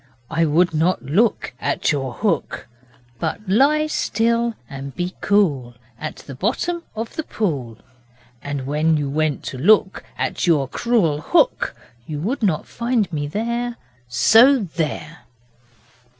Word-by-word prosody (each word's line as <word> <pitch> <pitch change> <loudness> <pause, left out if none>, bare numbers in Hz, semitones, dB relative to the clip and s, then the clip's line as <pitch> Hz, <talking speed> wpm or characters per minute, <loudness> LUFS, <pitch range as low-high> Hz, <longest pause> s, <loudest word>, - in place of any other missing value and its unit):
I 165 0 +2
would 165 +3 +3
not 165 +2 +1
look 195 - +1
At - - 0
your 135 -4 -2
hook, 190 - -2 0.5
But 215 - -3
lie 280 +10 +4
still 235 -4 0
and 135 0 -8
be 180 +1 -3
cool 145 -13 +1 0.2
At 155 - -5
the 140 - -10
bottom 265 - -1
of 225 +1 -5
the - - -1
pool 140 - -3 0.6
And 145 -2 -4
when 155 +3 +2
you 145 -1 -1
went 155 -1 0
to 130 - -6
look 190 +4 +3
At - - -1
your 150 -6 +3
cruel 170 - +1
hook, 350 - +2 0.3
You 150 - -4
would 230 - -2
not 185 -8 +1
find 235 -6 -1
me 145 -1 -2
there, 235 +7 -2 0.3
So 225 - +6
there! 165 - -4
175 Hz, 135 wpm, -21 LUFS, 145-225 Hz, 0.6 s, So